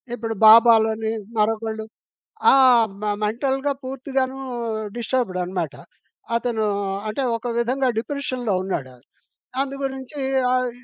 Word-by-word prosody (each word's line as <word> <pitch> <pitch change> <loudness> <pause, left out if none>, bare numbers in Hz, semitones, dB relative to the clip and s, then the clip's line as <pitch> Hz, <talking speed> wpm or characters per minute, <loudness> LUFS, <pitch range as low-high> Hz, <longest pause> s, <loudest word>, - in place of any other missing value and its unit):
ఇప్పుడు 225 -1 -4
బాబాలని 220 -1 +6 0.3
మరొకళ్ళు 220 0 -1 0.7
ఆ! - - +6 0.5
మె 210 -1 0
మెంటల్‌గా 270 +5 -1
పూర్తిగాను 265 0 -2 0.6
డిస్టర్బ్‌డ్ 235 -6 -1
అనమాట 175 -5 -3 0.6
అతను. 230 -2 0 0.4
అంటే 215 +6 -2
ఒక 240 +2 -7
విధంగా 255 +3 0
డిప్రెషన్‌లో 255 -4 -3
ఉన్నాడు. 135 -9 -4 0.7
అందుగురించి 270 0 -5 0.3
ఆహ్, 255 -1 +1
ఇ 250 - -21
235 Hz, 100 wpm, -22 LUFS, 220-265 Hz, 0.7 s, బాబాలని